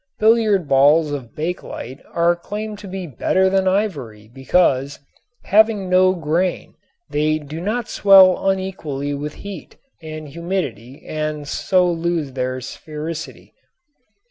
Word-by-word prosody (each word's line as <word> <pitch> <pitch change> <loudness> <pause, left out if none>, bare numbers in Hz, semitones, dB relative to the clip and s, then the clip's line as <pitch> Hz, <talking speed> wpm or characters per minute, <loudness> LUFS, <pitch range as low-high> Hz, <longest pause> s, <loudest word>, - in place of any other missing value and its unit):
Billiard 215 -5 +3
balls 145 +3 +4
of 130 -6 -6
bakelite 155 -5 -5
are 170 +1 +2
claimed 210 +4 -6
to 205 - -9
be 190 -1 -5
better 185 +6 +1
than 190 0 +2
ivory 140 - -2
because, 135 0 +1 0.5
having 210 -2 +3
no 185 0 +5
grain, 170 +2 -1 0.4
they 155 +1 +1
do 155 +2 -8
not 220 +5 -2
swell 195 -1 +6
unequally 155 -7 -3
with 145 +1 -5
heat 200 -5 -9 0.2
and 155 -1 -8
humidity 145 - -5
and 155 -1 -4
so 185 +4 +1
lose 170 -4 -1
their 130 0 -2
sphericity. 155 +4 -7
165 Hz, 120 wpm, -20 LUFS, 145-190 Hz, 0.5 s, swell